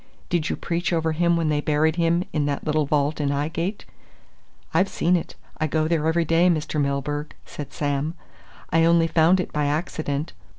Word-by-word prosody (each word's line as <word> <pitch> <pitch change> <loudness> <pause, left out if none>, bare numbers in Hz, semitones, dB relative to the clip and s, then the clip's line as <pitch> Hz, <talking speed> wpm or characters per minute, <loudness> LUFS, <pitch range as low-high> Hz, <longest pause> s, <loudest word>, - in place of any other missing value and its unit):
Did 170 -3 0
you - - -1
preach 170 -1 -2
over 165 -1 +1
him 170 +2 +2
when 165 -2 0
they 150 -1 +1
buried 155 +1 +2
him 170 0 +2
in 150 -2 0
that 140 -1 -2
little 155 -1 0
vault 150 +1 +1
in 145 - 0
'Ighgate? 165 +8 -2 0.9
I've 185 +4 +3
seen 175 +2 +1
it 170 - -3 0.2
I 155 - +1
go 155 +1 0
there 160 -2 +1
every 165 +1 +2
day, 165 +3 +4
Mr. 155 -2 0
Milburgh," 145 +2 -2
said 145 - -8
Sam. 145 +2 -2 0.6
"I 165 0 +4
only 165 0 +4
found 165 +3 +4
it 180 - -3
by 150 -1 0
accident. 150 -1 -2
160 Hz, 185 wpm, -24 LUFS, 150-170 Hz, 0.9 s, day